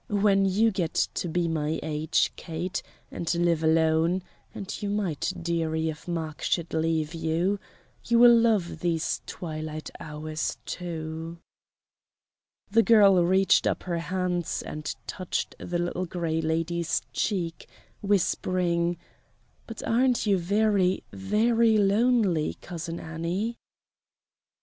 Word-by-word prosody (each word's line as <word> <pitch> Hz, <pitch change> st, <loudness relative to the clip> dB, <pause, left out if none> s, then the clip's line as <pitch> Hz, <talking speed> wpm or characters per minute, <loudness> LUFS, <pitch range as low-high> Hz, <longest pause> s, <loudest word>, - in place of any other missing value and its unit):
When 200 Hz, -1 st, +3 dB
you 210 Hz, +4 st, +3 dB
get 175 Hz, -5 st, -2 dB, 0.2 s
to -, -, -2 dB
be 170 Hz, +1 st, 0 dB
my 155 Hz, -1 st, -1 dB
age, 155 Hz, +1 st, +1 dB
Kate, 170 Hz, +2 st, -4 dB, 0.3 s
and 170 Hz, -, -2 dB
live 170 Hz, -2 st, +2 dB
alone 160 Hz, +3 st, +3 dB, 0.3 s
and 195 Hz, -, -6 dB
you 205 Hz, -, -2 dB
might, 195 Hz, -6 st, -1 dB
dearie, 160 Hz, -1 st, -1 dB
if 155 Hz, +2 st, -8 dB
Mark 160 Hz, -3 st, -4 dB
should 170 Hz, -2 st, -1 dB
leave 160 Hz, -1 st, 0 dB
you 170 Hz, +5 st, 0 dB, 0.5 s
you 235 Hz, -, +3 dB
will 240 Hz, 0 st, +8 dB
love 225 Hz, -6 st, +2 dB
these 170 Hz, -2 st, -1 dB
twilight 155 Hz, -2 st, -6 dB
hours, 155 Hz, +1 st, -4 dB
too." 165 Hz, -1 st, -5 dB, 1.3 s
The 230 Hz, +2 st, +6 dB
girl 200 Hz, -6 st, +6 dB
reached 190 Hz, +1 st, +4 dB
up -, -, -1 dB
her 175 Hz, -2 st, -2 dB
hands 180 Hz, 0 st, -2 dB
and 150 Hz, 0 st, -5 dB
touched 185 Hz, -2 st, -3 dB
the 175 Hz, -, -3 dB
Little 175 Hz, +1 st, -2 dB
Gray 165 Hz, -2 st, -1 dB
Lady's 165 Hz, +1 st, -1 dB
cheek, 175 Hz, -5 st, -2 dB, 0.3 s
whispering: 180 Hz, -3 st, +1 dB, 0.7 s
"But 225 Hz, -, -7 dB
aren't 245 Hz, +1 st, +2 dB
you 200 Hz, -3 st, +3 dB
very, 195 Hz, 0 st, +2 dB
very 220 Hz, +3 st, +2 dB
lonely. 205 Hz, -5 st, +2 dB
Cousin 170 Hz, -1 st, -6 dB
Annie?" 170 Hz, +8 st, -3 dB
175 Hz, 120 wpm, -27 LUFS, 160-195 Hz, 1.3 s, will